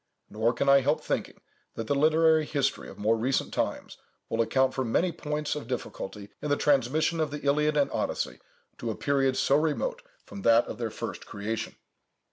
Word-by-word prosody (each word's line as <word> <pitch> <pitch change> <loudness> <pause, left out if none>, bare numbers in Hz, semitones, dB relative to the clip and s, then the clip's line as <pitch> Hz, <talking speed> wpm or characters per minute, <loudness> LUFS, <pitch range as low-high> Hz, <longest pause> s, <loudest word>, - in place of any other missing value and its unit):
Nor 110 +3 +1
can 140 +3 -1
I 140 0 +7
help 145 +4 +1
thinking, - - -3 0.4
that 115 - -4
the 125 - 0
literary 160 +2 +4
history 145 -2 -1
of - - -12
more 110 +2 +2
recent 125 +4 0
times - - -2 0.3
will 115 - +1
account 130 +4 +2
for 130 - -1
many 165 +9 +1
points 150 -2 -3
of 145 -6 -6
difficulty 105 -5 -5
in 150 - -3
the 145 - +2
transmission 150 +4 +2
of 155 -2 +1
the 145 0 -7
Iliad 150 +2 +2
and 145 - +2
Odyssey - - -2 0.4
to 120 - -3
a 110 - -2
period 135 -2 +1
so 140 - +3
remote 150 -1 -1 0.2
from 100 -1 -9
that 115 +3 +5
of - - -7
their 115 -2 -1
first - - -6
creation. 105 +2 -4
140 Hz, 190 wpm, -28 LUFS, 115-150 Hz, 0.4 s, I